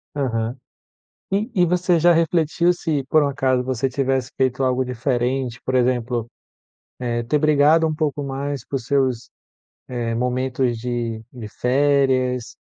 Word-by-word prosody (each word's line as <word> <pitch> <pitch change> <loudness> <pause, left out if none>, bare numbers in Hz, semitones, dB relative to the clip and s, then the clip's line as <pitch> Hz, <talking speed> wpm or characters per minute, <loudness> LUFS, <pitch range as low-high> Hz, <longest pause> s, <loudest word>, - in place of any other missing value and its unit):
Aham. 120 -3 -1 0.8
E 210 +5 0
e 180 -2 +4
você 180 0 +2
já 175 +2 +5
refletiu 165 +1 +2
se 155 -5 -2
por 155 +3 +4
um 145 - +2
acaso 130 -2 +1
você 130 +1 -1
tivesse 130 -1 -1
feito 130 0 0
algo 130 0 +1
diferente, 125 0 -2
por 130 - -2
exemplo, 120 -2 0 0.7
eh, 120 -1 -2
ter 140 +6 +1
brigado 155 +2 +4
um 155 - -1
pouco 150 -2 -2
mais 140 -1 -4
por 135 - -3
seus, 130 -1 0 0.6
eh, 120 -2 -3
momentos 125 0 -1
de 115 -2 -3
de 120 -4 -8
férias, 130 0 +1
130 Hz, 140 wpm, -21 LUFS, 125-145 Hz, 0.8 s, já